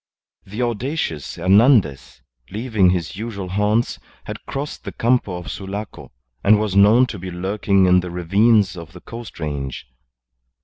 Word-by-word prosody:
The 105 +6 -3
audacious 120 - -3
Hernandez, 100 - +3 0.3
leaving 110 -3 +1
his 90 -2 -2
usual 100 -4 -5
haunts, 105 +4 0 0.2
had - - -8
crossed 140 +2 -5
the - - -6
Campo 115 -6 0
of 90 - -7
Sulaco, 100 +2 -7 0.3
and 105 0 +5
was 105 -3 -2
known 105 +6 +6
to 110 -6 -7
be 95 +1 -6
lurking 95 +2 +1
in 90 0 +5
the 90 0 -5
ravines 100 +4 +2
of 85 -2 -10
the 90 - -12
coast 115 -4 -10
range. 70 -4 -5
100 Hz, 145 wpm, -20 LUFS, 90-115 Hz, 0.3 s, known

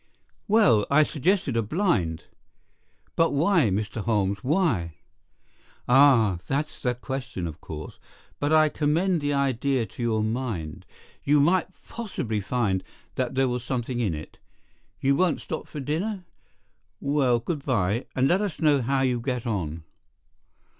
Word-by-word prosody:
"Well, 145 - +4
I 155 +2 +5
suggested 155 - 0
a 115 - +2
blind." 105 - 0 0.9
"But 165 -2 +2
why, 160 - +3
Mr. 105 +3 -2
Holmes, 100 -3 0
why?" 125 - +1 0.9
"Ah, 125 -8 +5
that's 145 +3 -2
the 125 -1 0
question, 125 -7 -5
of 80 0 -7
course. 75 -1 -8 0.4
But 145 +1 0
I 155 0 +6
commend 160 +4 +1
the 145 0 0
idea 135 -2 +1
to 120 - -10
your 110 -2 +1
mind. 110 - -4 0.4
You 145 +1 +4
might 170 +5 +3 0.2
possibly 130 - -3
find 100 -4 0 0.3
that 130 0 -2
there 135 0 +3
was 125 -1 -2
something 125 -1 -3
in 100 -9 0
it. 75 - -10 0.6
You 140 +1 +2
won't 180 +2 +2
stop - - -6
for 150 - -7
dinner? 180 +8 -3 0.7
Well, 140 -4 +2
good 140 +5 -4
bye, 115 -3 0
and 130 +1 +3
let 185 +6 +2
us 200 -7 -3
know 150 -3 +3
how 135 +3 0
you 125 -2 +1
get 125 -1 -3
on." 85 -8 -3
130 Hz, 145 wpm, -25 LUFS, 110-150 Hz, 0.9 s, I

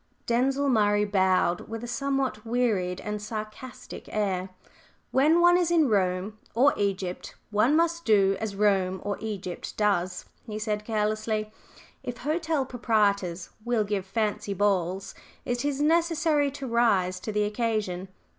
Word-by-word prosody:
Denzil 265 +4 +1
Murray 210 -4 +3
bowed 190 -3 +1
with 225 +1 -5
a - - -4
somewhat 265 -2 -1
wearied 220 -7 0
and 210 0 -4
sarcastic 215 +3 -7
air. 190 -3 -1 0.6
"When 310 +6 +4
one 350 +1 +6
is 350 -2 +1
in 325 -5 +3
Rome, 195 +1 0 0.2
or 270 +5 +5
Egypt, 195 -3 -3 0.2
one 225 +8 +3
must 335 +1 +1
do 195 -5 +4
as 220 -3 -4
Rome, 195 -2 +2
or 205 0 -2
Egypt, 200 -5 -5
does," 185 -4 0 0.2
he 215 -1 -4
said, 210 -1 -2
carelessly. 215 0 -1 0.5
"If 245 -1 -5
hotel 310 0 -1
proprietors 200 -8 0
will 240 -2 +1
give 200 -2 -2
fancy 205 -1 -1
balls, 190 -1 0 0.3
it 245 +1 -1
is 285 -1 -1
necessary 320 -2 +2
to 275 0 -7
rise 200 -6 +2
to 215 - -5
the 210 0 +1
occasion. 210 -4 -1
215 Hz, 140 wpm, -27 LUFS, 195-255 Hz, 0.6 s, one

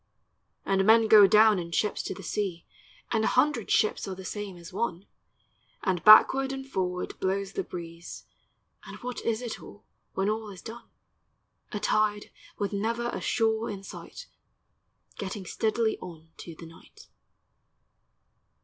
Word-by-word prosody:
And 195 0 +2
men 220 +2 +5
go 210 -2 +8
down 215 -1 +5
in 170 -1 -6
ships 210 +4 0
to - - -5
the 195 - -10
seas, 185 -3 -3 0.5
And 220 -2 +1
a - - +2
hundred 255 -4 +1
ships 215 - +1
are 190 - -4
the 190 0 -10
same 205 -2 -6
as 170 +1 -12
one; 190 -3 -3 0.8
And 185 -3 0
backward 265 +5 +7
and 270 0 -5
forward 180 -6 -3
blows 195 +1 -1
the - - -2
breeze, 170 0 -9 0.6
And - - -9
what 250 0 -5
is 230 +1 -1
it 235 - -5
all, 205 - -13 0.3
when 190 +1 0
all 215 0 -2
is 190 -3 -11
done? 235 +2 -10 0.8
A 210 - -3
tide 210 0 0 0.3
with 205 0 -2
never 230 +4 -1
a - - -5
shore 225 -1 0
in 195 -1 -6
sight - - -10 0.9
Getting 195 0 -5
steadily 220 +3 0
on 165 -3 -11
to 170 - -9
the 165 - -11
night. 165 0 -16
205 Hz, 155 wpm, -28 LUFS, 185-220 Hz, 0.9 s, go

